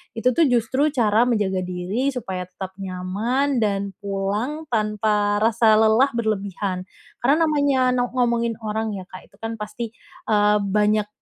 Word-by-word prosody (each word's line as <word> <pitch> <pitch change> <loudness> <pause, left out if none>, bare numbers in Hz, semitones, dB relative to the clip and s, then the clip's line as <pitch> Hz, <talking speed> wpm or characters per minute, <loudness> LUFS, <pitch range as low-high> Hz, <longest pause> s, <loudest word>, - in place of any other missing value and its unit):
itu 245 +3 +2
tuh 315 +5 +3
justru 250 +4 +2
cara 235 -6 +2
menjaga 205 -6 +1
diri 185 +8 -2
supaya 190 -7 -4
tetap 185 +1 -7
nyaman 205 +9 -1
dan 200 -2 0
pulang 205 +9 -2
tanpa 210 -2 +1
rasa 225 -1 +4
lelah 220 +4 +5
berlebihan. 200 -4 -2 0.3
Karena 285 +7 +3
namanya 285 -4 +2
no 245 0 +1
ngomongin 235 -2 +1
orang 220 0 -2
ya, 190 - -6
Kak, 185 0 -12
itu 200 - -25
kan 225 0 -4
pasti, 215 +2 -5 0.4
eee, 210 0 +4
banyak 210 +1 +1
215 Hz, 145 wpm, -22 LUFS, 200-245 Hz, 0.4 s, lelah